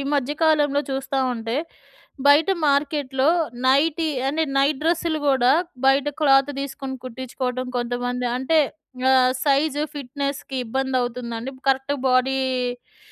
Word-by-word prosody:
మధ్య 280 0 -1
కాలంలో 295 -3 +3
చూస్తా 270 0 -2
ఉంటే 230 0 -4 0.7
బయట 300 +5 +5 0.2
మార్కెట్‌లో 280 -1 +1 0.4
నైటీ 305 +4 +2 0.2
అంటే 315 +3 0
నైట్ 275 0 +2
డ్రెస్సులు 330 -1 0
గూడా 260 -2 +4 0.3
బయట 270 +1 +4
క్లాత్ 275 -2 +4
తీసుకొని 270 -1 -5
కుట్టించుకోవడం 255 0 -4
కొంతమంది. 245 +1 -2
అంటే 265 +5 +1 0.5
ఆహ్, 255 -1 +5
సైజు 290 +1 +1
ఫిట్‌నెస్‌కి 280 0 -5
ఇబ్బంది 265 +3 -2
అవుతుందండి 245 0 -4 0.2
కరెక్ట్ 270 +1 +1
బాడీకి 255 -1 0
270 Hz, 110 wpm, -22 LUFS, 255-285 Hz, 0.7 s, బయట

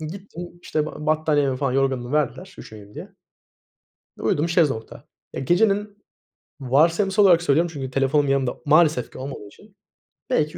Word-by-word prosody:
Gittim, 175 +2 -8 0.2
işte, 155 -1 -2
ba 150 -1 -8
battaniyemi 150 -4 +1
falan 135 -1 -1
yorganımı 135 -1 -1
verdiler, 180 +6 -2
üşümeyeyim 105 -1 -12
diye. 185 +7 -10 1.1
Uyudum 155 +3 0
şezlongda. 150 -9 -1 0.3
Ya, - - -5
gecenin, 205 - 0 0.6
varsayımsal 165 +10 +2
olarak 175 -3 +5
söylüyorum 165 +2 +2
çünkü 135 -4 -6
telefonum 135 +2 +1
yanımda 135 -2 0
maalesef 155 -4 +3
ki - - -11
olmadığı 130 -5 -7
için 200 - -19 0.5
belki 155 -9 0
150 Hz, 135 wpm, -22 LUFS, 135-175 Hz, 1.1 s, olarak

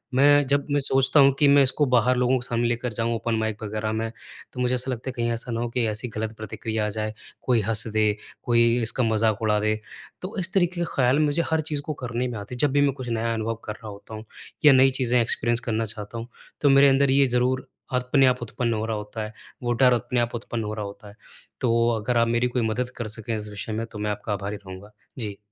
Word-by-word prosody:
मैं 145 +1 +5
जब 140 +1 +1
मैं 145 - +3
सोचता 135 +1 +3
हूँ 140 0 +7
कि 145 - +5
मैं 140 0 +6
इसको 135 +3 +2
बाहर 125 -1 +3
लोगों 125 +1 +2
सामने 120 -1 0
लेकर 120 0 -2
जाऊँ 115 +2 -1
ओपन 115 0 -1
माइक 110 -1 -2
वग़ैरह 110 +1 -3
में। 110 +1 -2 0.4
तो 125 - -8
मुझे 125 0 +1
ऐसा 130 +1 -1
लगता 125 +1 -4
है - - -2
कहीं 120 0 0
ऐसा 115 +1 -4
ना 115 - -2
हो 120 - -2
कि 120 0 0
ऐसी 105 +3 -4
गलत 110 0 -4
प्रतिक्रिया 110 0 -3
आ - - -1
जाए, 110 +1 -3 0.3
कोई 120 -3 +2
हँस 110 +2 -1
दे, 105 -1 +2 0.3
कोई 115 0 +3
इसका 115 +3 0
मज़ाक 110 -1 +1
उड़ा 105 -1 +2
दे। 110 +1 +1 0.5
तो 185 +3 -6
इस 185 +2 0
तरीके 180 -2 +1
के - - +1
ख़याल 130 +2 +3
मुझे 150 +2 +2
हर 160 - +2
चीज़ 150 -2 -3
को 155 - -2
करने 125 +1 -2
में 120 -3 -5
आते 100 +5 -7
हैं - - -8
जब 145 - +3
भी 145 +1 +3
मैं 140 -1 +3
कुछ 130 -2 -7
नया 115 0 -1
अनुभव 115 0 -2
कर 105 - -4
रहा 110 - -12
होता 100 +2 -10
हूँ 110 - -9 0.4
या 145 - +9
नई 130 +1 +6
चीज़ें 125 -1 +3
एक्सपीरिएन्स 120 +1 +1
करना 115 0 0
चाहता 105 +1 -6
हूँ 115 +1 -6 0.3
तो 145 - +4
मेरे 140 +1 +7
अंदर 135 0 +3
ये 140 +1 +5
ज़रूर 130 +1 +1 0.3
अपने 125 +2 +3
आप 125 -1 +1
उत्पन्न 120 0 -2
हो 110 0 -2
रहा 110 -1 -2
होता 105 +1 -6
है, 110 - -7 0.3
वो 120 0 +1
डर 125 +1 +4
अपने 120 +1 0
आप 120 0 -1
उत्पन्न 120 -1 -4
हो 105 0 -4
रहा 105 -1 -4
होता 100 +2 -10
है। 100 - -15 0.5
तो 115 -1 +2
अगर 115 +3 -1
आप 115 0 +3
मेरी 120 +1 +1
कोई 125 0 -1
मदद 125 +3 -1
कर 120 - -4
सकें 110 +1 -5
इस 105 -1 -5
विषय 105 +1 -5
में 115 +1 -2
तो 105 - -7
मैं 105 0 -1
आपका 105 +1 -3
आभारी 100 +1 -4
रहूँगा। 95 +3 -10 0.3
जी। 105 -4 -3
115 Hz, 255 wpm, -24 LUFS, 110-130 Hz, 0.5 s, या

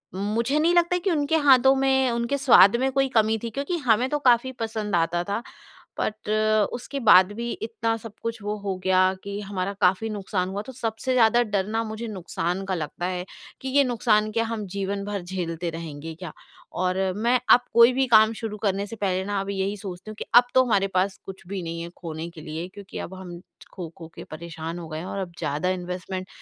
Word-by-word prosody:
मुझे 225 +8 0
नहीं 335 +3 +3
लगता 345 0 +3
कि 365 +1 -1
उनके 295 0 +1
हाथों 265 0 +7
में, 265 -1 +2
उनके 235 +4 -1
स्वाद 235 -7 +7
में 265 +1 +1
कोई 270 0 +2
कमी 220 0 +3
थी 230 - -2
क्योंकि 280 +9 -3
हमें 235 +4 +4
तो 295 - 0
काफ़ी 240 +2 +3
पसंद 215 -3 -2
आता 170 +1 +1
था, 200 +5 -3 0.6
बट 215 0 -3 0.4
उसके 260 +3 -5
बाद 190 -4 +6
भी 235 +2 -4
इतना 225 0 -2
सब 225 -1 -10
कुछ 230 0 -4
वो 210 +1 -2
हो 195 -2 -2
गया 185 0 +4
कि 200 0 -5
हमारा 195 -1 -3
काफ़ी 190 +5 +3
नुकसान 195 -3 -2
हुआ। 200 +1 -3
तो 260 - -9
सबसे 235 +1 -2
ज़्यादा 240 -1 +5
डर 205 -3 -1
ना 225 +1 -1
मुझे 220 +1 -5
नुकसान 180 -2 -3
का 190 -1 -1
लगता 170 +2 -4
है 180 -1 -3 0.4
कि 265 - -4
ये 285 - +7
नुकसान 220 -4 +2
क्या 230 +1 +1
हम 225 -2 -4
जीवन 200 0 -2
भर 205 -1 -3
झेलते 175 -2 -4
रहेंगे 160 -1 -7
क्या? 170 -1 -8 0.4
और 185 0 -1 0.2
मैं 240 +3 +2
अब 245 - +8
कोई 235 +2 +7
भी 265 +1 +2
काम 220 -1 +6
शुरू 220 -2 -5
करने 200 -1 0
से 225 - -7
पहले 190 -3 -1
ना 205 0 -1
अब 195 - -6
यही 195 +1 -2
सोचती 195 +1 -8
हूँ - - -10
कि - - -4
अब 245 - +10
तो 260 - +7
हमारे 200 -5 +2
पास 190 +1 +1
कुछ 190 -1 -10
भी 195 -1 -4
नहीं 165 0 -5
है 170 - -6
खोने 165 -1 -6
के 170 -2 -12
लिए 160 +3 -5
क्योंकि 200 -2 -9
अब 190 - -6
हम 180 -2 -9 0.3
खो-खो 170 -2 -8
के - - -8
परेशान 165 +1 -7
हो 165 - -8
गए 155 0 -5
हैं 175 - -6
और 195 - -4
अब 180 -3 -5
ज़्यादा 150 +3 -1
इन्वेस्टमेंट 185 +1 -4
205 Hz, 215 wpm, -25 LUFS, 185-235 Hz, 0.6 s, अब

